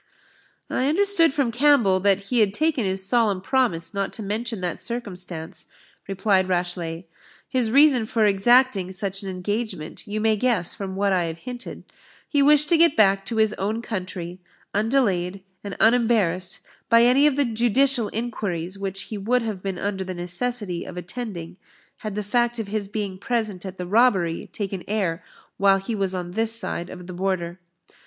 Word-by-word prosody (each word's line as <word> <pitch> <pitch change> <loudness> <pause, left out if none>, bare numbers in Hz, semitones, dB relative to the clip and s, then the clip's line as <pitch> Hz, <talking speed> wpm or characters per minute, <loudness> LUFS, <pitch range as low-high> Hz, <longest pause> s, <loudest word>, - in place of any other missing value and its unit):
"I 260 - 0
understood 340 0 +3
from 270 -4 0
Campbell, 240 -7 +4
that 195 0 +3
he 245 - +3
had 205 -2 +2
taken 305 -6 +1
his 190 0 +1
solemn 210 -2 +2
promise 220 -6 0
not 200 -1 -2
to 220 - -5
mention 220 +2 -3
that 180 -1 -2
circumstance," 180 -8 -5 0.4
replied 195 -1 +1
Rashleigh: 175 -2 -2 0.4
"his 255 -4 0
reason 265 -3 +5
for 225 -2 +2
exacting 205 -1 +3
such 195 +1 -3
an 195 - -6
engagement 190 -2 -4
you 210 +1 -3
may 220 0 +2
guess 230 -7 +1
from 190 -2 -6
what 200 0 +1
I 180 -2 +1
have 165 0 -5
hinted 250 +5 -8 0.4
he 285 - +2
wished 295 +1 +5
to 335 - +5
get 335 -2 +5
back 195 -2 +4
to 230 - -3
his 220 -1 +3
own 215 +4 -2
country, 185 -4 -5 0.3
undelayed 200 -5 0 0.2
and 200 -1 -6
unembarrassed 220 -6 +2 0.3
by 230 0 +6
any 260 +5 +5
of 290 - +1
the 285 0 +2
judicial 240 +1 +2
inquiries 200 -6 -4
which 195 0 -4
he 215 - -6
would 240 +5 +1
have 215 -5 -4
been 195 -2 -4
under 195 -1 -2
the 185 -1 -6
necessity 180 +2 -2
of 180 - -9
attending, 180 -2 -6 0.4
had 215 -2 -6
the 210 - -2
fact 240 +3 0
of 220 -3 -4
his 210 -1 -2
being 200 -2 -4
present 215 -5 -2
at 190 0 -8
the 180 - -4
robbery 190 -5 +2
taken 195 -3 -4
air 190 -5 -1 0.4
while 195 -1 +4
he 195 +4 -4
was 195 -3 -1
on 175 -1 -4
this 225 +3 +2
side 175 -6 -3
of 180 -1 -9
the 180 - -8
Border. 180 -1 -2
205 Hz, 175 wpm, -23 LUFS, 185-235 Hz, 0.4 s, by